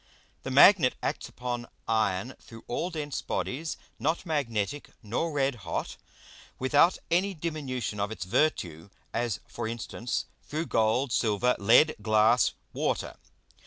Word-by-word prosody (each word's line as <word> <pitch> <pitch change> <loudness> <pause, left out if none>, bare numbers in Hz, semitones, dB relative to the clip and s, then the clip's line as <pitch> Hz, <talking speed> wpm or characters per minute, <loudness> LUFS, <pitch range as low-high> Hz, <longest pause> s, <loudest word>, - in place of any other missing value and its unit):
The - - -5
Magnet 140 +1 +7
acts - - -2
upon 120 -1 -4 0.2
Iron 110 +1 0
through 115 -1 -13
all 165 +8 -2
dense 150 -4 -4
Bodies 155 +5 -3 0.2
not 160 +6 0
magnetick 140 - -2
nor 120 +10 -1
red 140 -2 +1
hot, 85 -3 -4 0.6
without 145 +7 +4
any 190 +3 +2
diminution 140 -10 -3
of 100 0 0
its 100 -5 -5
Virtue; 90 - 0 0.2
as 115 -5 -1
for - - -5
instance, 115 +1 -3 0.2
through 155 +3 -4
Gold, 115 +3 +1
Silver, 115 +2 +2
Lead, 120 +10 +6
Glass, 110 +3 +4 0.2
Water. - - -1
125 Hz, 125 wpm, -28 LUFS, 110-150 Hz, 0.6 s, Magnet